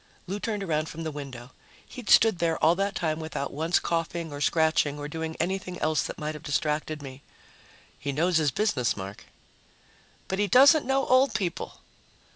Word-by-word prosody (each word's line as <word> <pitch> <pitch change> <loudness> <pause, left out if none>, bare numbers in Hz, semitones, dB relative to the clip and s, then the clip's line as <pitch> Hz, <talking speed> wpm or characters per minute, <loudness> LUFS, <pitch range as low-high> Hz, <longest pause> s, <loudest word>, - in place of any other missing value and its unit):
Lou 195 +3 -4
turned 210 -2 -3
around 155 -3 -1
from 165 +1 -7
the 160 - -3
window. 135 -4 -8 0.3
He'd 245 -5 -9
stood 220 -6 +6
there 165 -1 +1
all 160 +2 +4
that 195 +2 -1
time 160 -2 -1
without 160 -3 -4
once 160 +4 +1
coughing 165 -1 -2
or 145 - -6
scratching 160 -2 +2
or 145 0 -5
doing 160 +1 -5
anything 180 +1 -3
else 155 -3 +1
that - - -5
might 150 +1 -3
have 150 - -9
distracted 150 0 -2
me. 135 0 -9 0.8
"He 140 +2 -3
knows 165 +5 +2
his 155 -2 +2
business, 135 - 0
Mark." 95 +1 -8 1.0
"But 190 - -2
he 205 - +2
doesn't 280 - +6
know 270 0 +2
old 260 +2 +3
people." 185 -5 -3
160 Hz, 180 wpm, -27 LUFS, 150-190 Hz, 1.0 s, stood